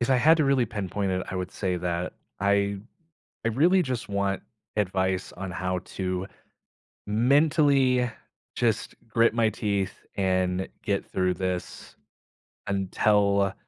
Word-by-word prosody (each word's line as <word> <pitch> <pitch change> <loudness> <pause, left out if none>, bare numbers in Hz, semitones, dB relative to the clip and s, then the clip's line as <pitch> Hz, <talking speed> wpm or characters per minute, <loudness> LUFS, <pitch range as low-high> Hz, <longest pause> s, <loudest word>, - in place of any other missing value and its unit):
if 120 +2 0
I 130 - +5
had 160 +6 +6
to 155 - +3
really 135 -4 +3
pinpoint 100 -1 -2
it, 90 0 -2
I 95 - -5
would 90 0 -3
say 90 -3 -2
that 90 0 -2 0.3
I 100 0 +2 0.7
I - - +3
really 175 +10 +4
just 125 -8 -3
want 100 -1 0 0.3
advice 95 -2 0
on 95 0 -6
how 90 0 -2
to 95 0 -4 0.8
mentally 135 +1 +3 0.5
just - - 0
grit 115 0 +3
my 115 -1 +3
teeth 100 -3 -1 0.2
and 95 -1 +1 0.2
get 100 -3 -1
through 90 -1 0
this 90 -1 -4 0.7
until 100 0 +2
100 Hz, 130 wpm, -26 LUFS, 95-120 Hz, 0.8 s, had